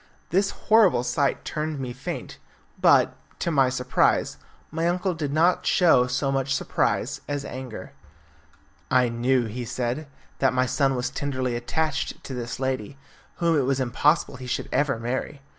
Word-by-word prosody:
This 195 Hz, +2 st, +2 dB
horrible 205 Hz, -, +3 dB
sight 125 Hz, +3 st, 0 dB
turned 155 Hz, -1 st, -3 dB
me 125 Hz, -2 st, -4 dB
faint, 130 Hz, -, -6 dB, 0.4 s
but, -, -, +5 dB, 0.2 s
to 170 Hz, -, -1 dB
my 135 Hz, -4 st, +4 dB
surprise, 125 Hz, -1 st, +1 dB, 0.3 s
my 165 Hz, +2 st, 0 dB
uncle 180 Hz, +2 st, 0 dB
did 150 Hz, -4 st, -3 dB
not 165 Hz, +4 st, +2 dB
show 160 Hz, -10 st, +5 dB
so 125 Hz, +2 st, 0 dB
much 135 Hz, 0 st, 0 dB
surprise 135 Hz, +3 st, -1 dB
as 145 Hz, -1 st, -3 dB
anger. 130 Hz, -3 st, -7 dB, 1.0 s
"I 125 Hz, -1 st, +3 dB
knew," 120 Hz, +1 st, +1 dB
he 115 Hz, +3 st, -5 dB
said, 125 Hz, +5 st, -3 dB, 0.3 s
"that 135 Hz, -1 st, +3 dB
my 130 Hz, 0 st, +3 dB
son 135 Hz, +1 st, +1 dB
was 125 Hz, +1 st, -2 dB
tenderly 130 Hz, -3 st, -2 dB
attached 155 Hz, +6 st, -2 dB
to 135 Hz, -, -7 dB
this 120 Hz, -1 st, -5 dB
lady, 130 Hz, -2 st, -3 dB, 0.4 s
whom 170 Hz, -1 st, +2 dB
it 145 Hz, -, +3 dB
was 135 Hz, 0 st, 0 dB
impossible 135 Hz, +3 st, +1 dB
he 125 Hz, 0 st, -8 dB
should -, -, -3 dB
ever 140 Hz, -4 st, +1 dB
marry. 125 Hz, +4 st, -4 dB
135 Hz, 160 wpm, -25 LUFS, 125-150 Hz, 1.0 s, but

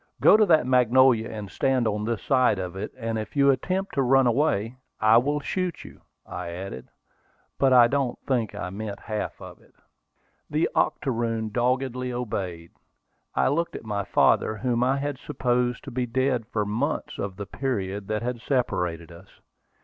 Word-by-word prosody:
"Go -, -, +7 dB
to 215 Hz, -1 st, +4 dB
that 160 Hz, -6 st, +4 dB
magnolia, 125 Hz, -2 st, +4 dB
and 105 Hz, -3 st, -7 dB
stand 130 Hz, -3 st, +1 dB
on 105 Hz, 0 st, -1 dB
this 115 Hz, -2 st, -2 dB
side 130 Hz, -6 st, +3 dB
of 90 Hz, -1 st, -5 dB
it: 95 Hz, -, -5 dB
and 115 Hz, -2 st, -3 dB
if 110 Hz, -, -7 dB
you 140 Hz, -1 st, +5 dB
attempt 190 Hz, +8 st, -2 dB
to 140 Hz, -, +1 dB
run 135 Hz, +1 st, +4 dB
away, 120 Hz, -2 st, +1 dB, 0.2 s
I 110 Hz, +1 st, +5 dB
will 145 Hz, +4 st, 0 dB
shoot 180 Hz, +2 st, -3 dB
you!" -, -, -14 dB, 0.2 s
I -, -, -6 dB
added; 85 Hz, -6 st, -7 dB, 0.7 s
but 135 Hz, -1 st, +4 dB
I 125 Hz, -2 st, +7 dB
don't 135 Hz, -1 st, -1 dB
think 120 Hz, -6 st, -1 dB
I 90 Hz, -, -5 dB
meant 100 Hz, 0 st, -6 dB
half 110 Hz, -1 st, -4 dB
of -, -, -11 dB
it. -, -, -25 dB, 0.7 s
The 150 Hz, +2 st, +1 dB
octoroon 115 Hz, -6 st, 0 dB
doggedly 125 Hz, +2 st, -1 dB
obeyed. 95 Hz, -9 st, -4 dB, 0.6 s
I -, -, +3 dB
looked 165 Hz, +5 st, -1 dB
at -, -, -7 dB
my 100 Hz, -2 st, -2 dB
father, 110 Hz, -, +2 dB
whom 120 Hz, +1 st, 0 dB
I 130 Hz, +2 st, +2 dB
had 140 Hz, -1 st, -3 dB
supposed 125 Hz, -3 st, -1 dB
to 140 Hz, -, -8 dB
be 125 Hz, 0 st, -2 dB
dead 130 Hz, -1 st, 0 dB
for 105 Hz, -4 st, -1 dB
months 120 Hz, +9 st, -2 dB
of 100 Hz, -2 st, -4 dB
the 100 Hz, +1 st, -6 dB
period 100 Hz, -5 st, -3 dB
that 110 Hz, +1 st, -2 dB
had 120 Hz, -1 st, -3 dB
separated 90 Hz, -, -1 dB
us. 85 Hz, +3 st, -14 dB
120 Hz, 175 wpm, -25 LUFS, 105-135 Hz, 0.7 s, Go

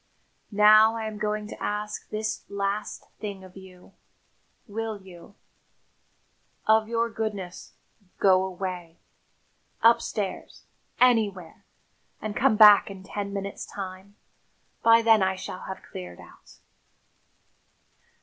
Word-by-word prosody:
Now 215 Hz, +1 st, +6 dB
I 225 Hz, -1 st, -4 dB
am 215 Hz, -1 st, -6 dB
going 210 Hz, 0 st, -2 dB
to -, -, -10 dB
ask 210 Hz, 0 st, -4 dB
this 215 Hz, 0 st, -3 dB
last 200 Hz, +1 st, -3 dB
thing 200 Hz, -3 st, -6 dB
of 185 Hz, -1 st, -14 dB
you: 185 Hz, -1 st, -15 dB, 0.7 s
will 220 Hz, -1 st, -5 dB
you, 190 Hz, +1 st, -15 dB, 1.3 s
of 220 Hz, 0 st, +4 dB
your 230 Hz, 0 st, 0 dB
goodness, 210 Hz, -5 st, -5 dB, 0.4 s
go 190 Hz, -1 st, +4 dB
away 180 Hz, -3 st, -6 dB, 0.9 s
upstairs, 220 Hz, -3 st, +1 dB, 0.4 s
anywhere 210 Hz, -9 st, +1 dB, 0.5 s
and 215 Hz, -1 st, -5 dB
come -, -, +3 dB
back 210 Hz, -1 st, +8 dB
in 195 Hz, -1 st, -10 dB
ten 200 Hz, +1 st, -5 dB
minutes' 200 Hz, 0 st, -5 dB
time? 190 Hz, +1 st, -8 dB, 0.7 s
By 230 Hz, 0 st, +5 dB
then 225 Hz, -2 st, +5 dB
I 190 Hz, 0 st, +1 dB
shall 185 Hz, 0 st, -7 dB
have 190 Hz, -, -7 dB
cleared 90 Hz, -1 st, -9 dB
out." -, -, -16 dB
205 Hz, 110 wpm, -26 LUFS, 190-215 Hz, 1.3 s, back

